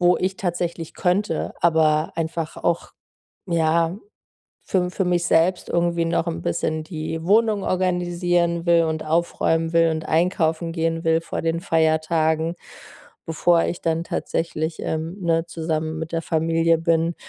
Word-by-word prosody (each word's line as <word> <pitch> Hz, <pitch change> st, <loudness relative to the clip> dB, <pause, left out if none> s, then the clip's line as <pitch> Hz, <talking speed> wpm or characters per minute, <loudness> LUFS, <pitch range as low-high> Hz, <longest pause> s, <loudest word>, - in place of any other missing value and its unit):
wo 180 Hz, 0 st, +4 dB
ich 190 Hz, +1 st, -1 dB
tatsächlich 175 Hz, -2 st, -3 dB
könnte, 180 Hz, -2 st, 0 dB
aber 160 Hz, -2 st, +3 dB
einfach 165 Hz, -1 st, -3 dB
auch, 170 Hz, -1 st, -1 dB, 0.6 s
ja, 165 Hz, +1 st, +1 dB, 0.7 s
für 190 Hz, -, +3 dB
m 180 Hz, 0 st, -1 dB
für 190 Hz, -, -1 dB
mich 175 Hz, -1 st, +1 dB
selbst 175 Hz, +3 st, +2 dB
irgendwie 170 Hz, -1 st, +1 dB
noch 165 Hz, -, 0 dB
'n 85 Hz, +1 st, -3 dB
bisschen 155 Hz, -, -1 dB
die 160 Hz, 0 st, -5 dB
Wohnung 210 Hz, 0 st, +3 dB
organisieren 175 Hz, -1 st, 0 dB
will 170 Hz, -1 st, +4 dB
und 160 Hz, 0 st, -2 dB
aufräumen 165 Hz, 0 st, 0 dB
will 165 Hz, -1 st, +4 dB
und 160 Hz, 0 st, -3 dB
einkaufen 165 Hz, 0 st, +1 dB
gehen 165 Hz, 0 st, -1 dB
will 165 Hz, 0 st, +3 dB
vor -, -, -4 dB
den 165 Hz, +1 st, -1 dB
Feiertagen, 160 Hz, -1 st, +1 dB, 0.7 s
bevor 165 Hz, +1 st, +2 dB
ich 175 Hz, -, -3 dB
dann 165 Hz, 0 st, 0 dB
tatsächlich, 160 Hz, -1 st, -3 dB
ähm, 160 Hz, +3 st, -3 dB
ne, 165 Hz, -1 st, +1 dB
zusammen 160 Hz, -1 st, -3 dB
mit 160 Hz, 0 st, -5 dB
der 165 Hz, -, 0 dB
Familie 165 Hz, +1 st, +2 dB
bin. 165 Hz, 0 st, +1 dB
165 Hz, 145 wpm, -22 LUFS, 160-175 Hz, 0.7 s, wo